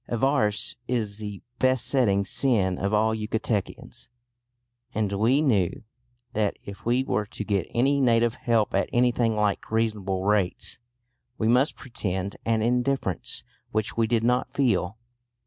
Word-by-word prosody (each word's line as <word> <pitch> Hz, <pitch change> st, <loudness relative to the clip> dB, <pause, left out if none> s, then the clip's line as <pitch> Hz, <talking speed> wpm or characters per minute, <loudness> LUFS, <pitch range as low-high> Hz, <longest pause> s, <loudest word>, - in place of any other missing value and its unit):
Avarice 120 Hz, -3 st, +1 dB
is 110 Hz, -4 st, -2 dB
the 105 Hz, -2 st, -7 dB, 0.2 s
besetting 125 Hz, -5 st, +3 dB
sin 100 Hz, -6 st, +1 dB
of 100 Hz, +1 st, -1 dB
all 110 Hz, +1 st, +2 dB
Yucatecans, 110 Hz, -1 st, -3 dB, 0.9 s
and 105 Hz, -2 st, 0 dB
we 120 Hz, +9 st, +3 dB
knew 105 Hz, -, +1 dB, 0.5 s
that 105 Hz, -2 st, 0 dB
if 100 Hz, +2 st, -9 dB
we 125 Hz, +2 st, +2 dB
were 105 Hz, -5 st, -1 dB
to 105 Hz, -, -5 dB
get 100 Hz, -3 st, -1 dB
any 140 Hz, +4 st, +2 dB
native 115 Hz, -2 st, +3 dB
help 115 Hz, -3 st, 0 dB
at 100 Hz, -, +1 dB
anything 120 Hz, -2 st, +2 dB
like 105 Hz, -2 st, 0 dB
reasonable 105 Hz, -4 st, -1 dB
rates 100 Hz, 0 st, 0 dB, 0.6 s
we 110 Hz, -, 0 dB
must 125 Hz, +6 st, +3 dB
pretend 100 Hz, -6 st, -3 dB
an 115 Hz, -1 st, +1 dB
indifference 125 Hz, -5 st, 0 dB, 0.3 s
which 110 Hz, 0 st, -2 dB
we 115 Hz, -1 st, +2 dB
did 115 Hz, -1 st, +1 dB
not 125 Hz, +1 st, +1 dB
feel. 105 Hz, -7 st, +1 dB
110 Hz, 135 wpm, -26 LUFS, 100-120 Hz, 0.9 s, besetting